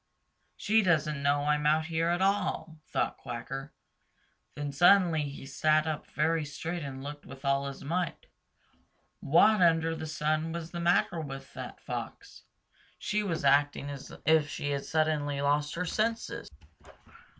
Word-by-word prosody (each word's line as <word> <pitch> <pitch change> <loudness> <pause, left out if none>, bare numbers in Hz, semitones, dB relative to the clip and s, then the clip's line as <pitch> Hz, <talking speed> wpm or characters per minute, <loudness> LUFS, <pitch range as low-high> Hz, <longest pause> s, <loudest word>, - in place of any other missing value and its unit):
"She 220 +2 +3
doesn't 155 -6 +1
know 145 0 +2
I'm 150 0 +1
out 155 +1 +3
here 165 0 0
at 175 +2 +1
all," 190 -5 0
thought - - -1
Quacker. 135 +4 -6 0.8
Then 145 -1 -4
suddenly 175 +1 +5
he 140 -1 -9
sat 155 +3 +2
up 155 -2 -3
very 160 +1 0
straight 160 +4 -5
and 135 -2 -6
looked 145 +1 -7
with 135 +1 -11
all 140 0 +1
his 140 - -7
might. 170 +3 -2 0.9
What 200 +7 +4
under 165 -1 +3
the 160 - -6
sun 155 +1 -1
was 170 -1 -5
the 175 - -5
matter 170 0 +2
with 135 -3 -8
that - - -8
Fox? - - -7 0.5
She 210 - -1
was 165 -8 -2
acting 145 +1 +3
as 140 -2 -8
if 160 -2 +4
she 145 0 -3
had 140 -1 -2
suddenly 150 -3 0
lost 145 +1 +1
her 180 +1 -2
senses. 225 +5 -2
155 Hz, 150 wpm, -30 LUFS, 145-170 Hz, 0.9 s, suddenly